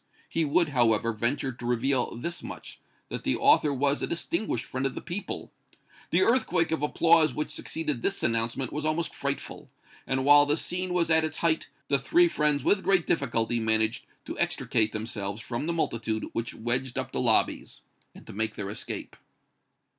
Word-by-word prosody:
He 165 -1 0
would, 155 +3 +2
however, 115 -4 +2
venture 120 +5 -1
to 120 0 -10
reveal 125 +1 +1
this 170 +8 -4
much, - - -9 0.3
that - - -5
the - - +1
author 150 - +4
was 140 +1 0
a - - -1
distinguished 170 - -2
friend 130 +2 -2
of 130 - -6
the - - -3
people. 190 +4 -5 0.6
The 185 - +3
earthquake 180 -9 +2
of 160 - 0
applause 155 -1 +4
which 150 - -3
succeeded 150 -6 -2
this 195 - -1
announcement 115 +2 -1
was 150 +1 -3
almost 155 +2 -1
frightful, 140 0 -5 0.4
and 130 0 0
while 145 0 +7
the 145 +2 +2
scene 180 +2 -3
was 170 -2 +2
at 160 0 +5
its 155 -1 -3
height, 165 -1 0 0.2
the 140 0 +2
three 345 - +4
friends 150 - +1
with 200 -1 +2
great 190 -2 +3
difficulty 120 -6 0
managed 110 0 0 0.2
to - - -6
extricate 110 -1 +1
themselves 105 -2 -4
from 120 +6 -4
the - - +1
multitude 115 -8 -1
which 115 0 -3
wedged 125 +3 -1
up - - -3
the - - -1
lobbies, - - +1 0.3
and - - -13
to - - -10
make 110 +2 -2
their 100 -1 -4
escape. - - -6
140 Hz, 180 wpm, -27 LUFS, 115-165 Hz, 0.6 s, while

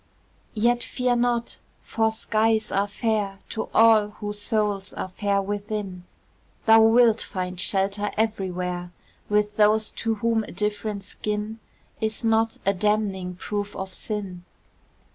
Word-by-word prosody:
Yet 240 +2 +2
fear 250 0 0
not! 240 -1 0 0.2
for 220 -1 +1
skies 220 0 +1
are 200 +1 +1
fair 205 -2 -1
To 220 - -4
all 225 -2 +6
whose 205 -1 -5
souls 205 -3 0
are - - -4
fair 200 +1 0
within; 200 -2 -4 0.6
Thou 225 0 +7
wilt 230 -1 +5
find 185 -2 -4
shelter 200 +1 0
everywhere 180 -5 -2 0.4
With 210 0 +1
those 215 0 +4
to 225 -1 0
whom 225 +1 +1
a - - -9
different 210 +1 -2
skin 210 +2 -4 0.4
Is 220 +1 -2
not 225 0 +2
a 195 - +3
damning 195 -2 0
proof 205 +2 -4
of 190 -1 -5
sin. 195 -5 -5
210 Hz, 130 wpm, -25 LUFS, 195-220 Hz, 0.6 s, Thou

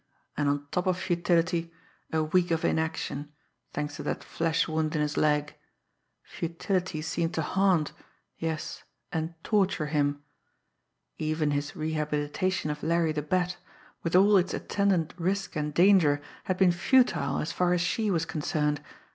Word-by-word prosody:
And 145 -1 +1
on 145 0 -1
top 180 +1 0
of 185 -1 +2
futility, 170 -1 +1 0.4
a 160 -1 +1
week 175 +3 +2
of 165 -1 0
inaction, 150 -2 -1 0.4
thanks 150 -1 -4
to - - -5
that - - -3
flesh 165 0 0
wound 155 -1 -1
in 150 - +1
his 150 0 -2
leg. 150 -1 +2 0.7
Futility 170 0 -2
seemed 165 +1 -1
to 160 - 0
haunt, 185 -3 +2 0.5
yes, 160 -1 -3 0.3
and 160 +1 -2
torture 195 -7 +1
him! 145 -1 0 1.0
Even 155 -1 0
his 145 0 -2
rehabilitation 155 +2 -1
of 150 - -6
Larry 165 0 +2
the 150 -1 -2
Bat, 180 +4 0 0.4
with 165 +1 -1
all 200 +2 +7
its 185 0 +1
attendant 195 -5 0
risk 195 +3 -1
and 150 -1 -1
danger, 170 -4 +5 0.3
had 185 - -1
been 185 -2 +5
futile 175 - +3
as 160 - -2
far 180 -1 +1
as 180 -1 +2
she 210 +5 0
was 165 -4 +1
concerned. 150 -1 -1
165 Hz, 150 wpm, -28 LUFS, 150-180 Hz, 1.0 s, all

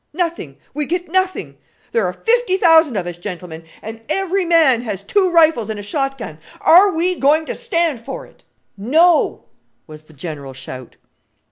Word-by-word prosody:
Nothing! 330 - -3 0.2
we 295 0 -3
get 350 -1 -3
nothing! 375 0 -1 0.3
There 225 -5 +1
are 180 - -3
fifty 455 - +1
thousand 325 - +4
of 185 - -2
us, 175 -1 -7
gentlemen, 175 -3 -8 0.2
and 225 +1 -8
every 385 +2 0
man 320 -8 +4
has 205 -5 -5
two 375 - +1
rifles 320 - +3
and 215 -1 -4
a - - -7
shot 270 +5 -2
gun. 160 - -8 0.2
Are 385 +4 +6
we 355 +2 0
going 305 +3 +3
to - - -4
stand 340 - -1
for 270 +4 -8
it?" - - -23 0.3
"No," 310 - +2 0.4
was 155 -1 -13
the 155 - -19
general 145 -2 -7
shout. 130 -1 -10
275 Hz, 170 wpm, -18 LUFS, -, 0.4 s, Are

